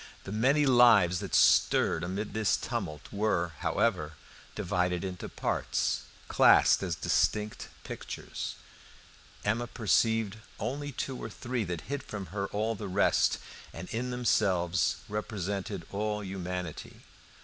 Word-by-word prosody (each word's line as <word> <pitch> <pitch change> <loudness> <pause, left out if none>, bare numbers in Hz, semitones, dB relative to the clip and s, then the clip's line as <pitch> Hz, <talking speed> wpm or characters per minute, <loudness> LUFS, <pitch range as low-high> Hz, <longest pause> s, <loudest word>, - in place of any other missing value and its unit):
The 95 - -7
many 135 +8 +3
lives 115 -9 +6
that - - -3
stirred 80 - +4
amid 95 +5 -3
this 110 -2 +2
tumult 75 -1 -4
were, 100 -5 0
however, 95 -9 0 0.4
divided 90 0 0
into 90 -2 -5
parts, - - -1 0.2
classed - - +5
as 90 -4 -2
distinct 105 +7 0 0.2
pictures. - - -6 0.9
Emma 115 +4 0
perceived 110 -1 +1 0.2
only 145 +3 -3
two 130 0 -4
or - - -4
three 120 +2 -3
that 85 -2 -4
hid 145 +1 -4
from 100 -3 -6
her 100 -1 -2
all 110 +3 -1
the 105 -1 -6
rest, 100 +2 +3 0.4
and 90 +2 -7
in 125 +3 -2
themselves 95 -8 +1
represented 100 -3 -4
all 105 +1 -2
humanity. 90 -3 -5
105 Hz, 125 wpm, -30 LUFS, 90-115 Hz, 0.9 s, lives